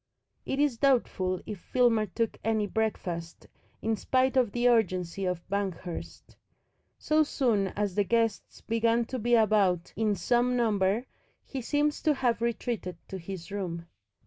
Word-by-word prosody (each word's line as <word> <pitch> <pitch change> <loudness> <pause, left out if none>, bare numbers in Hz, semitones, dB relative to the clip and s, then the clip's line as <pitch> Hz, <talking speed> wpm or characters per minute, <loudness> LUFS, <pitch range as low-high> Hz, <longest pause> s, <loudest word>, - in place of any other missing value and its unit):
It 270 - -1
is 285 -6 +2
doubtful 190 -9 +1
if 210 -3 -6
Filmer 230 -1 +2
took 225 +4 -2
any 220 -1 +1
breakfast, 180 -6 -3 0.4
in 225 0 +1
spite 260 +4 +1
of 250 -5 +3
the 240 +2 +1
urgency 190 -5 +1
of 180 -2 -3
Banghurst. 190 -3 -5 0.6
So 310 0 +2
soon 235 -9 +1
as 205 -2 -1
the 205 - +2
guests 225 0 -1
began 230 +1 +1
to 255 +2 -4
be 240 +2 +3
about 205 -6 +2
in 215 -1 +1
some 240 +6 +1
number 215 0 +1 0.4
he 270 - -5
seems 295 +4 0
to 305 -2 +2
have 245 -3 0
retreated 235 -6 -2
to 190 - -5
his 185 +1 -8
room. 175 -4 -4
220 Hz, 145 wpm, -29 LUFS, 190-240 Hz, 0.6 s, of